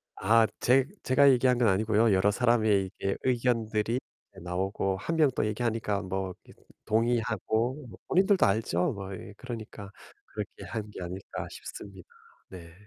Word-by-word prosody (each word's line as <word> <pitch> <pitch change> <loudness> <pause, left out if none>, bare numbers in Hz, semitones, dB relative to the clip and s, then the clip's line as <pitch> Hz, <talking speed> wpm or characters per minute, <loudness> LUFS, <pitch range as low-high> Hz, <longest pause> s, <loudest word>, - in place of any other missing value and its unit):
아. 110 +3 +4
제 130 +1 +4 0.2
제가 140 +2 +5
얘기한 125 0 +3
건 120 -2 +3
아니고요. 110 +2 +3
여러 100 +2 +3
사람의 110 -4 +2 0.2
이게 95 - 0
의견들이 115 -2 0 0.4
나오고 95 +2 -1
1 165 +12 -3
명 155 -3 +4
또 - - +1
얘기하니까 110 -2 -1
뭐 95 -1 -3
이렇게 - - -19 0.2
동의하고 115 +3 0
뭐 90 - -13
본인들도 190 +1 +4
알죠, 100 -4 +1
뭐 100 -1 -7
이 95 +2 -9
그러니까 110 -5 -8 0.4
'그렇게 - - -7
한 105 -1 -4
게 95 - -8
아닐까.' 90 +2 -6
싶습니다. 95 -3 -10 0.4
네. 85 -3 -11
110 Hz, 315 characters per minute, -28 LUFS, 95-120 Hz, 0.4 s, 제가